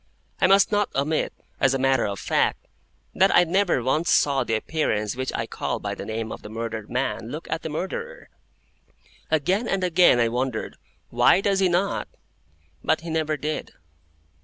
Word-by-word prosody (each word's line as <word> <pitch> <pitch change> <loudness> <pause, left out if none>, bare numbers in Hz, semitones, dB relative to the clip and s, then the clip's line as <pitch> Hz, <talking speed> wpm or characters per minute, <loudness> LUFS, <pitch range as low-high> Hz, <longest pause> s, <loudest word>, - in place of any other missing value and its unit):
I - - +4
must 195 +1 +5
not 205 -1 +1
omit, 150 +3 0 0.3
as 135 0 +3
a - - +1
matter 135 -1 +2
of 100 -1 -4
fact, - - 0 0.5
that 190 +1 +4
I 175 - +7
never 175 -6 +1
once 155 +7 +1
saw 140 -2 +3
the 115 - -1
Appearance 110 -5 -1
which 130 +1 -3
I - - -2
call - - -3
by - - -4
the - - -7
name 110 0 -4
of - - -7
the 105 - -10
murdered 110 -1 -5
man 125 -3 -2
look 155 +5 -7
at 160 - -1
the - - -5
Murderer. 465 - -5 1.0
Again 180 - +1
and 195 -1 -1
again 175 -7 +5
I 115 - +3
wondered, 125 0 -3 0.3
"Why - - +5
does 195 0 +1
he 190 -2 +3
not?" 180 +3 0 0.8
But 160 - +1
he 165 0 -6
never 155 -1 0
did. 150 +1 -4
155 Hz, 180 wpm, -24 LUFS, 120-180 Hz, 1.0 s, I